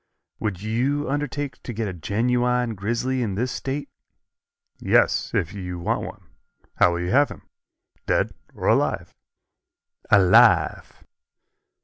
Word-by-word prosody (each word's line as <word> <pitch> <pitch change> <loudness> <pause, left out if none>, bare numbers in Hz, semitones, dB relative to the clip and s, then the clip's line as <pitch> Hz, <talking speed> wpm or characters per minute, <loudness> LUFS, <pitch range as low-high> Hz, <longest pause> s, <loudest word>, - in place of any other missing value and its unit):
"Would 100 -3 -3
you 130 +7 0
undertake 145 -1 -3
to 120 - -6
get 110 0 -2
a 95 - -4
genuine 120 +7 0
grizzly 120 +6 -2
in 105 -5 -2
this 125 +5 -1
State?" 140 +2 -4 0.9
"Yes, - - +2
if 85 - 0
you 90 -3 -5
want 85 - -1
one. - - -9 0.5
How 85 - +4
will 85 - -2
you 90 - -2
have 145 +4 +4
him - - -11 0.6
dead - - +1 0.2
or - - -3
alive?" - - +1 1.0
"Alive." 95 -3 +4
115 Hz, 125 wpm, -23 LUFS, 95-130 Hz, 1.0 s, How